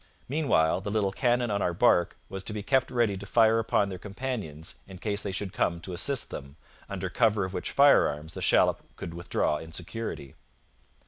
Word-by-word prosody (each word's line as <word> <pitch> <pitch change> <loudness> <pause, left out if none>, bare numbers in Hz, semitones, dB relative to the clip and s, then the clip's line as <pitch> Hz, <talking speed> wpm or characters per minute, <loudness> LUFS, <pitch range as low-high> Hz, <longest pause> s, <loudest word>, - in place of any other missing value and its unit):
Meanwhile, 125 - +2
the 100 - -4
little 100 -2 +1
cannon 120 +1 +1
on 100 0 0
our 90 -2 0
barque 90 -4 +3
was 95 0 -6
to 105 - -5
be 105 -1 -4
kept 130 +2 +2
ready 115 -5 +1
to 100 +1 -7
fire 115 +1 +4
upon 105 -2 +1
their 95 -2 -6
companions 100 - -5
in 95 -1 -10
case 100 +1 -2
they 100 - -3
should 95 0 -4
come 85 -1 0
to 90 - -6
assist 135 +9 +1
them, 70 -1 -8 0.3
under 95 -1 -3
cover 105 0 +2
of 95 - -7
which - - -3
firearms 80 - +4
the - - -6
shallop - - +3
could 85 - -7
withdraw 85 -3 -1
in 80 +2 -9
security. 90 - -5
100 Hz, 195 wpm, -28 LUFS, 85-115 Hz, 0.3 s, fire